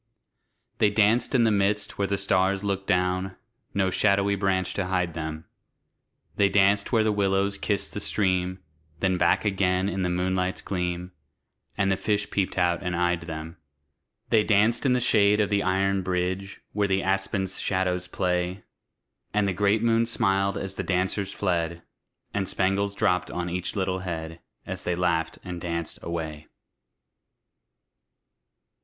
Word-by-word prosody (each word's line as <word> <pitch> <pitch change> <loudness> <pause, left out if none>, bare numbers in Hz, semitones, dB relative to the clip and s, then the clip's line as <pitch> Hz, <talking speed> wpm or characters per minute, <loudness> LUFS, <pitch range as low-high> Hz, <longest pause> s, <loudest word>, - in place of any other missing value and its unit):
They 105 - +5
danced 110 +5 +2
in 120 - +5
the 110 - +4
midst 100 +1 0
where 100 - +1
the 100 - 0
stars 95 0 +1
look 100 -1 -2
down 90 0 0 0.4
No 95 -1 +2
shadowy 100 0 +2
branch 95 -2 0
to 95 -2 -2
hide 90 -2 0
them; 80 0 -5 0.9
They 100 -1 +4
danced 100 0 +3
where 115 -3 +4
the 110 - +2
willows 100 0 +1
kiss 100 -2 -1
the - - -6
stream, 95 -2 0 0.4
Then 95 -1 +1
back 90 +4 +3
again 95 -2 +1
in 95 -1 -2
the 90 - 0
moonlight's 90 +1 -1
gleam, 90 -1 -3 0.7
And 100 -1 +2
the 95 - +1
fish 105 0 -1
peeped 95 -2 -1
out 90 0 +2
and 90 -2 -2
eyed 90 0 +1
them. 80 0 -7 0.7
They 110 -2 +5
danced 110 +5 +3
in 125 - +4
the 125 - +2
shade 105 -3 +4
of 105 -1 +1
the 100 -1 +2
iron 95 +1 +1
bridge, 95 +2 -2
Where 105 -1 +1
the 95 0 +1
aspen's 95 0 -1
shadows 90 -1 -1
play; 90 +1 -1 0.7
And 105 -1 +3
the 95 - 0
great 105 +3 +2
moon 115 0 +3
smiled 100 -4 +1
as 95 0 -4
the - - -4
dancers 95 +1 -1
fled, 85 -4 -1 0.5
And 95 -2 -1
spangles 100 +1 0
dropped 90 -2 +1
on 90 0 -3
each 90 +3 -3
little 95 -2 -1
head, 80 -2 -5 0.3
As - - -4
they 90 - 0
laughed 85 -2 0
and 90 -2 -6
danced 85 -2 -4
away. 80 -3 -5
95 Hz, 155 wpm, -26 LUFS, 90-100 Hz, 0.9 s, They